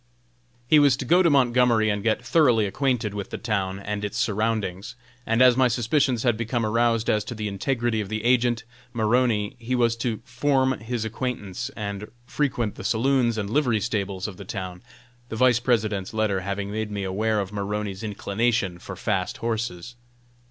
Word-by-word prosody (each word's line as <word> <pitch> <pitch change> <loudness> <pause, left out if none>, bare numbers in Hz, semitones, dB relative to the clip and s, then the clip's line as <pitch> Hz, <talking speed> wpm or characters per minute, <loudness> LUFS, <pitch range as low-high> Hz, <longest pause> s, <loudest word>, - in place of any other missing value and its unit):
He 155 +3 +6
was 140 -3 +5
to 130 - -5
go 175 +8 +5
to 170 - +4
Montgomery 125 -5 +3
and 105 0 -2
get 115 +2 0
thoroughly 120 -7 +4
acquainted 120 -1 -1
with 100 -1 -5
the - - -5
town 100 -5 -2
and 105 +1 -4
its 105 +2 -3
surroundings; 110 -5 -1 0.3
and 115 +3 +4
as 125 -1 +6
my 130 0 +4
suspicions 120 +1 +1
had 120 -3 +3
become 115 0 -1
aroused 115 +1 +1
as 105 -1 +2
to 120 - -6
the 105 -1 -3
integrity 115 +2 -1
of 100 - -6
the 110 0 -3
agent, 120 -1 +2 0.3
Maroney, 110 -2 +1
he 120 +2 -2
was 120 -2 +2
to 115 -2 -2
form 130 +1 +1
his 110 +1 -3
acquaintance, 120 -1 -4
and 100 -1 -5 0.2
frequent 125 -5 -1
the - - -9
saloons 120 +2 +2
and 100 -1 -3
livery 125 -6 +2
stables 100 -4 -2
of 100 - -8
the 100 - -8
town, 90 -2 -6 0.5
the - - -5
Vice 120 +1 +4
President's 110 -5 0
letter 110 -3 +1
having 100 +1 -4
made 110 0 -3
me 100 -1 -4
aware 105 +3 0
of 100 -1 -3
Maroney's 100 -1 -3
inclination 105 -2 -1
for - - -8
fast - - -2
horses. 115 -2 -3
110 Hz, 180 wpm, -25 LUFS, 105-125 Hz, 0.5 s, He